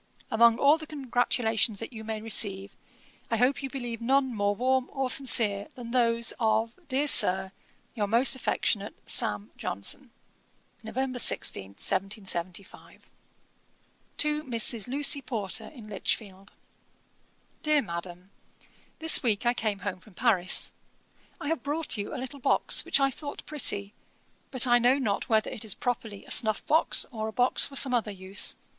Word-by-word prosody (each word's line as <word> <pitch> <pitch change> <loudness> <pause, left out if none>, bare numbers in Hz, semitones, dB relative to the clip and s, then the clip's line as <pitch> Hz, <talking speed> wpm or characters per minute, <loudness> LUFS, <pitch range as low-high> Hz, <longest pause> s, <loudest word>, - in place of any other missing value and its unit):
Among 230 0 +4
all 290 +4 +4
the 315 - -9
congratulations 245 -6 -1
that 230 - -8
you 220 -1 -9
may 220 -1 -5
receive, 200 -3 +1 0.5
I 230 - 0
hope 250 +5 +1
you 270 - -5
believe 240 -4 -6
none 265 +1 +1
more 205 -1 -1
warm 260 +3 0
or 270 -2 -3
sincere, 220 -7 +2
than 235 -2 -9
those 235 -2 +1
of, 225 0 0
dear 280 +2 0
Sir, 190 -7 +3 0.4
'Your 210 -4 -2
most 235 +6 +4
affectionate, 210 -5 -2
'SAM. 105 +1 +1
JOHNSON.' 170 - -4 0.7
'November 255 +3 -4
16, 100 - +1
1775.' 190 - -5 1.1
'TO 300 0 +2
MRS. 230 -3 +1
LUCY 280 +2 +2
PORTER, 220 -8 -4
IN 240 -8 -13
LICHFIELD. 195 -1 -5 1.1
'DEAR 305 -2 +2
MADAM, 175 0 -8 0.7
'This 320 0 +5
week 225 -2 0
I 240 - +3
came 215 -4 -2
home 185 -2 -4
from 190 0 -20
Paris. 190 -5 +2 0.7
I - - -6
have 325 - -2
brought 300 +1 -1
you 205 - -5
a - - -5
little 265 +2 -7
box, - - +2
which - - +1
I 275 0 +2
thought 285 +2 -9
pretty; 205 -9 +1 0.6
but 255 -2 +3
I 240 -1 +4
know 250 +3 +3
not 215 -8 -2
whether 220 -1 +1
it 220 - -5
is 215 -3 -1
properly 225 -4 -5
a - - -13
snuff 215 -2 +5
box, 320 +2 +3
or 220 -2 -5
a - - -5
box 245 +3 +3
for 275 - -13
some 265 -2 +6
other 230 -3 0
use. 195 0 0
230 Hz, 155 wpm, -27 LUFS, 205-260 Hz, 1.1 s, some